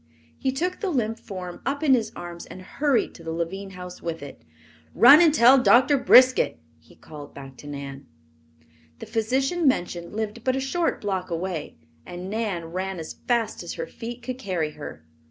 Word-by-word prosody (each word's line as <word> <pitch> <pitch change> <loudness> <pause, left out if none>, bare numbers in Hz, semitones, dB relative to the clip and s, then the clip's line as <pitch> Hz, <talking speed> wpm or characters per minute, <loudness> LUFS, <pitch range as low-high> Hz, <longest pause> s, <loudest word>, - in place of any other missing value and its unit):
He 265 - -1
took 355 +7 -2
the 400 - -2
limp 230 -8 -1
form 185 -4 -8
up 285 +2 -2
in 280 -4 +5
his 225 -4 +1
arms 175 0 -8
and 185 - -10
hurried 275 +5 0
to 165 - -13
the 165 - -4
Lavine 190 +4 -4
house 180 -1 -9
with 165 -3 -5
it. 145 - -10 0.5
"Run 245 - +9
and 330 -3 +6
tell 265 -2 +6
Doctor 255 +3 +5
Briskett," 255 - +5 0.2
he 80 - -21
called 145 -2 -12
back 135 -1 -10
to 145 - -12
Nan. 140 -1 -7 0.9
The - - -8
physician 270 +9 0
mentioned 175 -6 -1
lived 220 +1 -4
but 260 0 +1
a - - 0
short 330 +6 -1
block 190 -3 -2
away, 170 -2 -4 0.3
and 180 +2 -7
Nan 210 -6 -2
ran 190 +1 -3
as 160 -2 -6
fast 235 -3 0
as - - -6
her - - -4
feet 240 - -8
could 255 +1 -5
carry 175 -8 -2
her. 145 - -10
205 Hz, 185 wpm, -25 LUFS, 170-260 Hz, 0.9 s, Run